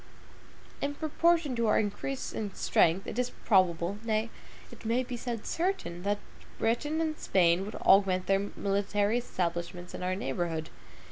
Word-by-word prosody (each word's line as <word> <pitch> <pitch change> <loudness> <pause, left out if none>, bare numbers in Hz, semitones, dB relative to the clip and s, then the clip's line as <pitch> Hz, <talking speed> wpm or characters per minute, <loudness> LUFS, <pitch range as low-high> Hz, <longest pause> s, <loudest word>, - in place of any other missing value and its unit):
In 285 0 -1
proportion 315 -2 +2
to 235 -1 +1
our 215 - +4
increase 220 +6 -3
in 205 -3 -4
strength, 175 +4 +3
it - - -4
is 250 0 +1 0.2
probable, 185 -1 +3
nay, 220 0 0 0.4
it - - -13
may 235 +3 +1
be 250 0 -5
said 235 -2 -4
certain, 345 - -2
that 205 +2 0 0.4
Britain 295 +8 0
and 315 -1 -1
Spain 175 -1 +3
would 210 - -7
augment 190 -2 +4
their 195 +1 +1
military 205 +3 +1
establishments 175 -4 -3
in - - -6
our 185 +1 0
neighborhood. 160 0 -3
205 Hz, 150 wpm, -30 LUFS, 185-245 Hz, 0.4 s, our